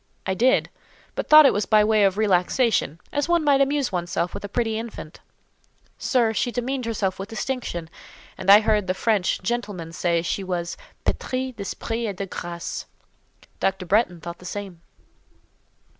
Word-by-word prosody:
"I 190 - 0
did; 245 +7 +2 0.4
but - - -4
I - - -35
thought 305 0 +10
it - - +6
was 205 -1 -1
by 215 -1 +5
way 215 -1 +3
of 195 0 +1
relaxation—as 215 - +1
one 345 -2 +3
might 280 -2 +4
amuse 275 -2 +1
one's 175 -2 -2
self 175 0 -1
with - - -6
a 205 - -5
pretty 225 0 -1
infant." 225 -8 -8 0.8
"Sir, 235 -4 +2
she 245 - 0
demeaned 255 +1 -2
herself 200 -5 -1
with 195 +2 -6
distinction; 225 -8 -4 0.5
and 190 - -4
I 205 +2 +9
heard 210 -2 +1
the 185 - 0
French 200 -3 0
gentlemen 200 -7 -3
say 170 -1 0
she 195 +3 -2
was 175 -2 -3 0.3
'pétrie 255 0 -2
d'esprit 225 +3 -4
et 200 - -4
de 195 - -4
graces.' 170 -2 -6 0.7
Dr. 190 -1 -1
Bretton 185 -2 +2
thought 170 0 -7
the - - -15
same." 185 -2 -6
205 Hz, 170 wpm, -24 LUFS, 180-240 Hz, 0.8 s, thought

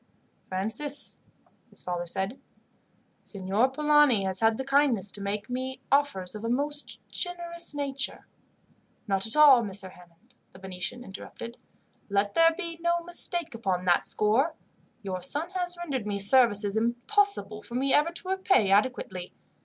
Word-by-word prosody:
"Francis," 225 +10 -2 0.5
his - - -7
father 175 -1 -3
said, 195 +8 -2 0.8
"Signor 200 +5 0
Polani 295 -6 +4
has 190 -1 -1
had 225 0 +3
the 265 - -4
kindness 270 -8 +2
to 205 - -4
make 205 +1 -3
me 260 +1 -4
offers 275 -11 +1
of 215 0 -8
a 230 - -2
most 290 +4 -2
generous 340 -3 -3
nature." 275 -2 -2 0.8
"Not 195 +1 0
at 220 - +2
all, 290 -5 +8
Messer 195 -2 -1
Hammond," 180 +7 -20 0.2
the - - -13
Venetian 190 +6 -5
interrupted. 230 +2 -9 0.5
"Let 200 0 +1
there 330 0 +5
be 335 -3 -6
no 345 0 +1
mistake 345 -2 0
upon 190 -5 -2
that 175 -1 +3
score. 245 +10 +2 0.5
Your 185 -2 -4
son 295 - -3
has 355 -1 -1
rendered 275 -11 -4
me 205 -1 -1
services 205 -1 +4
impossible 235 - +1
for 235 - -10
me 270 +2 +1
ever 300 +3 +3
to 355 +2 -5
repay 380 - +2
adequately. 195 -4 0
240 Hz, 145 wpm, -27 LUFS, 200-295 Hz, 0.8 s, all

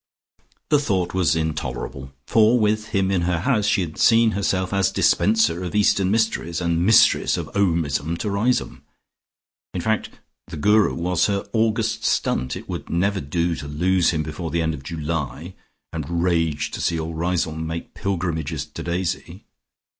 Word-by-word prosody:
The 150 - +4
thought 95 -10 -1
was 90 -3 +2
intolerable, 75 -4 -4
for 110 - +4
with 110 0 +1
him 95 -3 0
in 95 -3 +1
her 85 -1 0
house, 110 -3 +1
she 105 - +2
had 80 -3 -5
seen 115 -1 +5
herself 95 -2 -1
as 100 -2 +2
dispenser 105 -5 +2
of 90 +2 -5
Eastern 100 -2 +3
Mysteries, 105 -6 0
and 85 -1 0
Mistress 110 +4 +4
of - - -6
Omism 85 -4 0
to 105 +4 -3
Riseholme. 115 +6 0 0.9
In 90 - -1
fact 110 +3 -1 0.4
the - - -8
Guru 105 +6 +3
was 90 +1 +1
her 100 -1 -2
August 110 0 0
stunt; 65 0 0
it - - -9
would - - -6
never 95 +3 0
do 85 +5 -1
to 70 - -7
lose 90 +5 +2
him 80 -2 0
before 80 +2 -5
the 85 +1 0
end 80 0 0
of 70 - -7
July, 80 +2 -4 0.4
and 85 +1 -2
rage 80 -5 0
to - - -5
see 85 - 0
all 80 +1 -4
Riseholme 80 -1 -2
making 80 +1 -5
pilgrimages 80 -6 -3
to 75 - -9
Daisy. 90 +1 -4
90 Hz, 165 wpm, -22 LUFS, 80-100 Hz, 0.9 s, seen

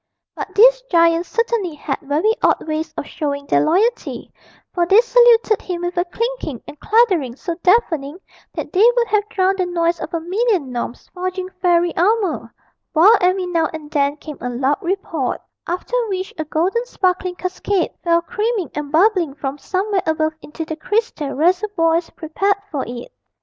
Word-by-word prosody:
But - - -7
these - - +6
giants 335 0 +3
certainly 460 -7 -1
had 300 - -4
very 310 +9 +1
odd - - +2
ways 310 +1 -2
of - - -3
showing 285 -3 -4
their 145 - +2
loyalty, 440 - 0 0.4
for 345 -1 +1
they 395 +4 +6
saluted 475 -2 +4
him 350 -2 -4
with 350 0 -3
a 350 0 +1
clinking 460 - -4
and 295 - -11
clattering 380 - +2
so 340 +5 -4
deafening 335 -7 +2 0.4
that - - -5
they 415 +5 +6
would 470 -1 +3
have 420 0 +1
drowned 380 0 +1
the 365 - +1
noise 340 -1 0
of 315 - -6
a 335 - -1
million 365 - 0
gnomes 240 0 -5
forging 370 0 -4
fairy 345 -1 +2
armour, 395 0 +1 0.4
while 365 +8 +7
every 365 +1 +2
now 335 -3 +1
and 305 -1 -9
then 285 -1 +1
came 300 -1 -9
a 245 - -3
loud 265 +6 0
report, 340 -7 -2 0.3
after 360 +7 -4 0.2
which 375 -1 -3
a 315 - -2
golden 360 +10 0
sparkling 365 -4 -1
cascade 370 +1 -1
fell 340 -1 +2
creaming 445 -3 -2
and 295 -1 -5
bubbling 340 -3 +3
from 285 -1 -5
somewhere 390 +3 -1
above 315 0 +1
into 320 +2 -7
the 315 - -5
crystal 380 -4 -2
reservoirs 340 0 +1
prepared 390 +6 -1
for 285 -4 -2
it. 245 - -8
355 Hz, 170 wpm, -19 LUFS, 315-405 Hz, 0.4 s, while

